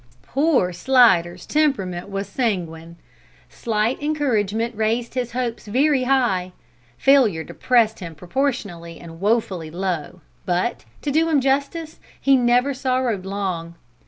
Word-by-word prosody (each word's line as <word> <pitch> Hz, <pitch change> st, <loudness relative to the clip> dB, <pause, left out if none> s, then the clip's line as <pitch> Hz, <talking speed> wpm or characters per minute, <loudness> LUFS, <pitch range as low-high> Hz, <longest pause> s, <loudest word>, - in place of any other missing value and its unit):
Poor 270 Hz, -, +1 dB
Slidder's 180 Hz, -5 st, +3 dB
temperament 200 Hz, -, 0 dB
was 195 Hz, 0 st, -4 dB
sanguine. 170 Hz, -8 st, -3 dB, 0.6 s
Slight 225 Hz, +3 st, -1 dB
encouragement 235 Hz, -7 st, 0 dB
raised 225 Hz, +2 st, -1 dB
his 245 Hz, -2 st, -3 dB
hopes 240 Hz, -3 st, -3 dB
very 265 Hz, +4 st, +2 dB
high. 230 Hz, -9 st, +1 dB, 0.4 s
Failure 240 Hz, -12 st, +4 dB
depressed 230 Hz, 0 st, +1 dB
him 170 Hz, -3 st, -8 dB
proportionally 175 Hz, -, -3 dB
and 165 Hz, 0 st, -12 dB
woefully 200 Hz, -6 st, 0 dB
low, 175 Hz, -1 st, -4 dB, 0.2 s
but, 180 Hz, +6 st, -1 dB, 0.2 s
to 290 Hz, -, -1 dB
do 325 Hz, +3 st, +2 dB
him 305 Hz, -3 st, +3 dB
justice, 280 Hz, +4 st, -1 dB, 0.2 s
he 275 Hz, 0 st, +4 dB
never 250 Hz, +2 st, +3 dB
sorrowed 255 Hz, -7 st, -1 dB
long. 185 Hz, -4 st, -3 dB
225 Hz, 120 wpm, -22 LUFS, 180-265 Hz, 0.6 s, Failure